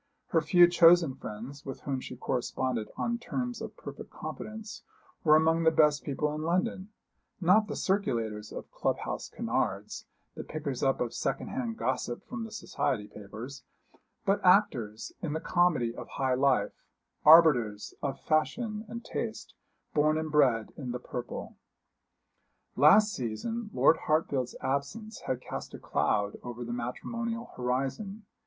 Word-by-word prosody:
Her 165 - +3
few 175 +2 +6
chosen 170 -3 +6
friends, 130 +4 -8
with 135 - -7
whom 135 -2 -2
she 125 - -7
corresponded 125 -2 -2
on 235 0 -1
terms 245 0 -3
of - - -7
perfect - - -9
confidence, 215 0 -7 0.4
were 155 -2 +6
among 160 +1 +4
the 165 - +5
best 150 -2 +3
people 150 +1 -1
in 155 - -4
London 185 +4 -1 0.5
not 195 +4 +4
the - - -4
circulators 115 - -1
of - - -8
club - - 0
house - - -5
canards, - - -2 0.3
the - - -7
pickers 145 -5 -4
up 135 -1 +2
of 120 -2 -1
second - - -2
hand 235 -3 -3
gossip 125 -2 -2
from 230 -3 -5
the 225 - -10
society 160 - -2
papers, 110 +8 -9 0.6
but 195 +1 +2
actors 125 - +3
in 155 -3 -2
the 160 - -1
comedy 165 -10 +2
of 120 - -8
high 130 -2 0
life, 135 +2 +2 0.5
arbiters 135 -10 +6
of 140 -2 -3
fashion 215 +8 0
and 235 +2 -7
taste, - - -4 0.4
born 155 +1 +3
and 155 -1 -3
bred 125 -7 +3
in 125 -4 -5
the 125 - -3
purple. 125 0 -6 1.2
Last 205 +8 +6
season 210 - -3
Lord 160 - +5
Hartfield's 145 -6 0
absence 170 +12 -3
had 130 -1 -1
cast - - -6
a - - -9
cloud 105 -1 0
over 120 0 -6
the 120 - -4
matrimonial 230 - -4
horizon. 135 - -2
150 Hz, 150 wpm, -30 LUFS, 125-190 Hz, 1.2 s, few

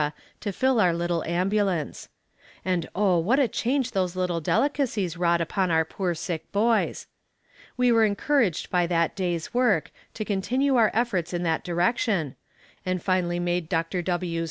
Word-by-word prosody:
to 205 - -3
fill 260 +4 +1
our 175 -3 +3
little 170 -1 -1
ambulance; 185 -2 -1 0.6
and 180 -3 -1
oh, 190 -3 +3
what 215 +11 +2
a 275 -3 +4
change 255 +4 -1
those 185 -3 -1
little 180 -2 -1
delicacies 225 - 0
wrought 170 0 +2
upon 185 +3 0
our 160 -1 +3
poor 180 +1 -2
sick 160 -1 -5
boys. 220 +3 +1 0.7
We 250 -1 +3
were 230 -1 +5
encouraged 215 - +1
by 175 -1 +2
that 170 -1 +1
day's 175 -2 -2
work, 240 -10 +2 0.2
to 215 - -4
continue 250 +8 +1
our 225 -3 +5
efforts 185 -8 0
in 175 - -2
that 165 -2 0
direction, 175 - 0 0.5
and 185 0 -1
finally 175 -1 0
made 175 -1 -1
Dr. 165 +2 -1
W.' 175 -1 -2
185 Hz, 155 wpm, -25 LUFS, 170-220 Hz, 0.7 s, were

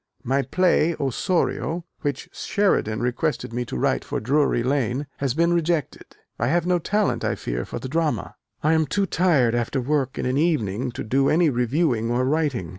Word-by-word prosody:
My 135 +3 +1
play 170 0 +2
Osorio, 165 - -1
which 145 -2 -3
Sheridan 155 - 0
requested 125 +1 -1
me 125 +1 -2
to 65 - -5
write - - +1
for - - -3
Drury 135 0 +1
Lane, 130 +1 0
has 140 -2 -1
been 170 +2 +3
rejected: 165 -4 -1 0.2
I 120 - +1
have 170 +4 +1
no 180 0 +2
talent, 205 +5 0
I - - 0
fear, - - -4
for - - -6
the - - -5
drama. 150 -8 -1 0.3
I 155 +2 +4
am 160 -1 +2
too 200 +5 +1
tired 160 -11 +2
after 120 +3 -1
work 135 0 -1
in - - -2
an 130 +2 +1
evening 130 - 0
to - - -5
do 135 +5 +2
any 165 -1 +3
reviewing 125 -1 +1
or 125 +2 +1
writing. 140 - 0
140 Hz, 185 wpm, -23 LUFS, 120-165 Hz, 0.3 s, I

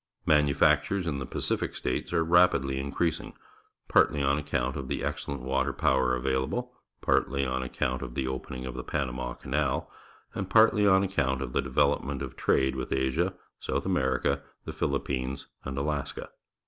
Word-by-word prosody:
]\Ianufactures 75 +5 +3
in 75 -4 -2
the 65 - -5
Pacific - - -2
States 60 - -2
are 85 -1 +2
rapidly 80 -6 +3
increasing, 70 +4 -2 0.5
partly 75 - +4
on 70 +2 +2
account 65 -3 -1
of 70 -3 -5
the - - -2
excellent 70 -2 -3
water 65 +2 0
power 65 -1 +2
available, 65 - -1 0.3
partly 70 +1 +1
on 65 0 -1
account 65 0 -2
of - - -6
the 65 - -1
opening 65 0 -5
of 65 - -5
tlie 65 0 -7
Panama 65 -4 -2
Canal, 70 0 -1 0.4
and 95 - -4
partly 110 -2 +5
on 95 0 +5
account 65 -9 0
of 60 -1 -6
the - - +2
development 70 0 +1
of 65 - -7
trade 65 0 +2
with 65 -1 -4
Asia, 75 +8 0 0.2
South - - -2
America, 65 +1 +1 0.2
the - - -5
Philip - - -1
pines, 65 +1 -3 0.2
and 70 0 -4
Alaska. 70 0 -3
70 Hz, 160 wpm, -28 LUFS, 65-75 Hz, 0.5 s, partly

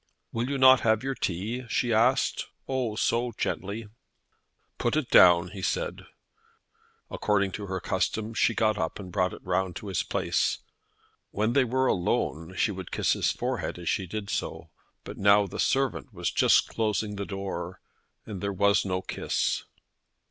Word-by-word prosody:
"Will 120 +3 -2
you 140 - -1
not 130 -1 +7
have 110 +1 +2
your 135 0 -1
tea?" 110 +4 -3
she 120 0 +1
asked 110 +2 +2 0.2
oh, 130 -5 -1
so 120 +2 0
gently. 105 +3 -3 0.9
"Put 120 +3 0
it 155 -5 -1
down," 85 0 +7
he 95 +1 -8
said. - - -2 1.0
According 100 -2 +1
to 100 +1 -6
her 95 0 -3
custom, 110 +5 -2
she 115 0 +2
got 110 -2 +1
up 80 -1 -2
and 95 -3 -8
brought 90 +1 +1
it - - -11
round 90 -1 -1
to 105 - -7
his 95 - 0
place. - - 0 0.7
When 110 +3 0
they 135 -1 +4
were 130 +2 +1
alone 85 -4 -1
she 105 - +2
would 95 -3 -7
kiss - - +1
his - - +1
forehead - - -3
as 85 - -4
she 95 - -1
did 105 +2 -5
so; 80 0 -4 0.3
but - - -9
now 100 +1 +5
the 95 - -7
servant 135 0 0
was 90 -4 -2
just - - +4
closing 105 -1 -1
the 100 - -3
door, 95 -2 -5 0.5
and 100 -4 -7
there 100 0 -1
was 100 +1 +3
no 95 -1 -2
kiss. - - -1
105 Hz, 170 wpm, -27 LUFS, 95-115 Hz, 1.0 s, not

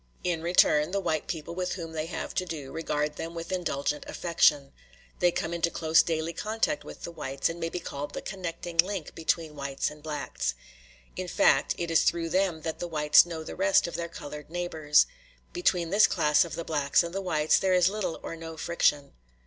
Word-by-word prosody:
In 175 -2 -1
return, 160 -3 +4
the 200 +2 -1
white 155 -5 -1
people 165 0 -5
with 180 +1 -2
whom 165 -3 -6
they 160 0 -3
have - - -5
to 185 - 0
do 150 -6 -6
regard 150 -2 -2
them 165 +1 -6
with 165 +2 -6
indulgent 150 -5 -1
affection. 150 -5 +2 0.5
They 175 0 +4
come 170 0 -3
into 170 0 +1
close 160 -1 +4
daily 165 0 -2
contact 225 - -1
with - - -11
the 170 - -5
whites, 135 -4 -2
and 165 +1 -6
may 165 0 -2
be 180 - -4
called 145 -3 -6
the - - -4
connecting 175 -3 -6
link 185 -1 +2
between 160 -1 -1
whites 140 0 -2
and 150 0 -13
blacks; 145 - -3 0.6
in - - -4
fact, - - +3
it 170 -1 -3
is 165 - +5
through 170 -1 +1
them 180 -3 0
that 160 -1 -4
the 175 - -3
whites 150 0 +5
know 165 -2 -5
the - - -7
rest 195 +1 +3
of 170 - -5
their 170 0 -3
colored 150 -2 -9
neighbors. 160 -4 +2 0.5
Between 180 - +1
this 205 +2 +6
class 150 0 +3
of 170 - -6
the 170 - -5
blacks 145 0 +2
and 170 0 -6
the 195 - -2
whites 155 -5 +2
there 190 -1 +2
is 180 -1 +5
little 195 -4 -2
or - - -5
no 165 -1 -8
friction. 150 -4 +1
165 Hz, 205 wpm, -28 LUFS, 150-175 Hz, 0.6 s, this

